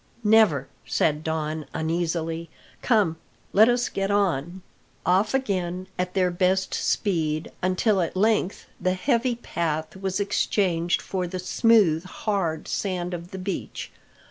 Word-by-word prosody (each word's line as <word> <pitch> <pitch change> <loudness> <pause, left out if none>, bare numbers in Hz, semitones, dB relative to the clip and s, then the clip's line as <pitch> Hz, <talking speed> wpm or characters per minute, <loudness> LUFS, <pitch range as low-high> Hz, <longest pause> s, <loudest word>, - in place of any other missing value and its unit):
"Never," 210 - +4 0.2
said 150 +6 +1
Don 155 -2 -2
uneasily. 165 0 -2 0.3
"Come, 205 -9 +2 0.4
let 220 +4 +7
us 245 0 +2
get 195 0 -2
on!" 185 -3 0 0.4
Off 195 +7 +3
again 185 -8 -1
at 180 0 -2
their 185 -2 +2
best 185 +2 +1
speed, 160 -5 0
until 185 +2 +2
at 170 +2 -2
length 210 -1 +1
the 185 0 +1
heavy 240 +4 +1
path 160 -8 -3
was 190 0 -2
exchanged 180 -4 +1
for 185 -2 -2
the 185 - -5
smooth, 185 -3 +3
hard 185 -5 -2
sand 180 -3 -2
of 175 0 -6
the 190 - -7
beach. 190 +1 -5
185 Hz, 130 wpm, -25 LUFS, 165-200 Hz, 0.4 s, let